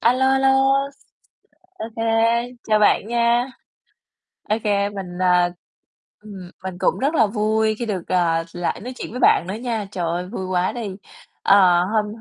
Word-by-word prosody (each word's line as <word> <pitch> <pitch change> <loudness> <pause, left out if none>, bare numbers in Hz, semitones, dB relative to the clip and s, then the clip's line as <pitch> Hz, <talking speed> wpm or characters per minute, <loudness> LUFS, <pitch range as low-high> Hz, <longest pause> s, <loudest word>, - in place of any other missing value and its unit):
A 235 - +4
lô, 265 +1 +1
a 265 0 +3
lô, 270 0 +3 1.3
OK, 225 -4 -7 0.7
chào 215 -1 +3
bạn 210 -1 +3
nha. 235 +1 +2 1.0
OK, 215 +1 0 0.3
mình, 180 -3 -7
à 180 -1 +3 0.7
ừm, 195 -4 -10
mình 185 -1 -6
cũng - - +1
rất 280 +5 0
là 225 -8 +4
vui 220 +1 0
khi 240 - -3
được, 190 -6 -4
ờ, 165 -2 +1
lại 175 -1 -3
nói 250 +3 -7
chuyện - - -6
với 250 - -6
bạn - - +4
nữa 190 - -3
nha. 225 -2 -3
Trời 180 -2 -3
ơi, 175 +2 -2
vui 190 0 -6
quá 185 0 0
đi. 215 -6 -6 0.5
Ờ, 180 -3 +5
hôm 210 +2 0
210 Hz, 165 wpm, -21 LUFS, 180-235 Hz, 1.3 s, Ờ